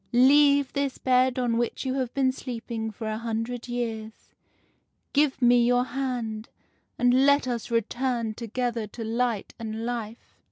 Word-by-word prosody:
Leave 280 +2 +5
this 280 -1 -1
bed 255 0 +2
on 240 -2 +1
which 240 +3 -2
you 260 - 0
have 260 -3 -2
been 265 -2 +3
sleeping 235 -3 -5
for 220 +1 -8
a 215 0 -2
hundred 230 +1 -3
years, 225 -3 -5 0.8
give 290 -1 +2
me 240 0 +6
your 245 +1 +3
hand, 240 -5 -4 0.5
and 245 +2 +4
let 280 -1 +4
us 240 -2 -3
return 235 0 -1
together 235 0 -3
to 225 +3 -8
light 230 -1 -1
and 225 0 -4
life. 235 -2 -6
240 Hz, 150 wpm, -26 LUFS, 225-255 Hz, 0.8 s, me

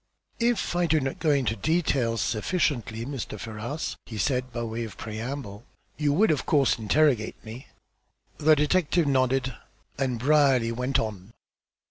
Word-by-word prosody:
"If 235 -6 +1
I 175 -1 +2
do 160 -1 +3
not 135 -1 -3
go 160 - +1
into 135 -6 +2
details 135 - 0
sufficiently, 115 - -1
Mr. 130 -6 -5
Ferrars," 115 +8 -5
he 110 - -7
said, 125 +3 0
by 120 0 -3
way 115 +1 -3
of 110 - -8
preamble, 110 -1 -6 0.3
"you 150 -1 +1
will, 185 +6 +4
of 150 - -1
course, 140 -5 +3
interrogate 120 0 +2
me." 115 +5 -9 0.7
The 155 +1 +5
detective 165 +2 +2
nodded, 130 -1 +1 0.5
and 130 -3 0
Brierly 135 -3 +3
went 125 +3 0
on. 105 -1 -4
130 Hz, 145 wpm, -26 LUFS, 115-150 Hz, 0.7 s, The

